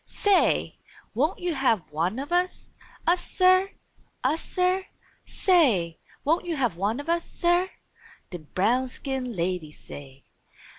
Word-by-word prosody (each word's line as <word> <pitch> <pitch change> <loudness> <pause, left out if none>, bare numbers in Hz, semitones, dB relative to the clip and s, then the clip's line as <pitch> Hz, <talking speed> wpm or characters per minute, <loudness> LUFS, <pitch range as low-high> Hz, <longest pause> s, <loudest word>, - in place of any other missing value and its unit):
"Say! 405 -2 +1 0.3
Won't 295 - +1
you 350 -1 -2
have 240 - +1
one 170 +10 -1
o' - - -2
us? 355 +4 -1 0.3
Us, 350 +1 +2
Sir? 370 +1 +4 0.5
Us, 295 +6 +1
Sir? 370 +1 0 0.4
Say! 230 - +2 0.3
Won't 330 +4 +1
you 335 - -1
have 245 - 0
one 205 +8 -1
o' - - -4
us, 335 +2 0
Sir?" 350 +2 +1 0.6
dem 170 -4 -8
brown 245 +7 +2
skin 255 -1 -4
ladies 170 -3 -3
say. 135 -1 -11
270 Hz, 135 wpm, -26 LUFS, -, 0.6 s, Sir